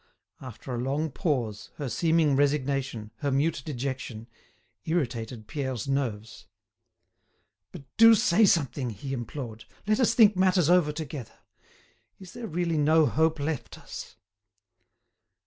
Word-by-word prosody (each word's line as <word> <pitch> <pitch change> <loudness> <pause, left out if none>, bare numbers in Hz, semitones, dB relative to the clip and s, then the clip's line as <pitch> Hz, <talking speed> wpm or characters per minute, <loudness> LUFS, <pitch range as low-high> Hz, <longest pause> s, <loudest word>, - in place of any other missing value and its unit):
After 130 0 -8
a 120 - -2
long 140 +5 -1
pause, 125 - -2
her 145 - -4
seeming 160 +3 +2
resignation, 135 -5 0
her 140 - -2
mute 140 +2 +1
dejection, 130 -5 -5 0.6
irritated 120 -8 -2
Pierre's 130 -4 -4
nerves. 115 -6 -3 1.2
"But - - -10
do 225 0 +8
say 205 +1 +4
something!" 140 -7 +1
he 115 +6 -6
implored; 120 -2 -6 0.2
"let 215 +3 +1
us 250 - +3
think 215 -3 +6
matters 185 -3 +3
over 175 -4 +4
together. 150 -5 -7 0.8
Is 185 -2 -12
there 240 -2 -6
really 170 -2 -1
no 155 +2 +4
hope 160 +1 +1
left 145 -1 -4
us?" - - -9
145 Hz, 125 wpm, -27 LUFS, 125-165 Hz, 1.2 s, do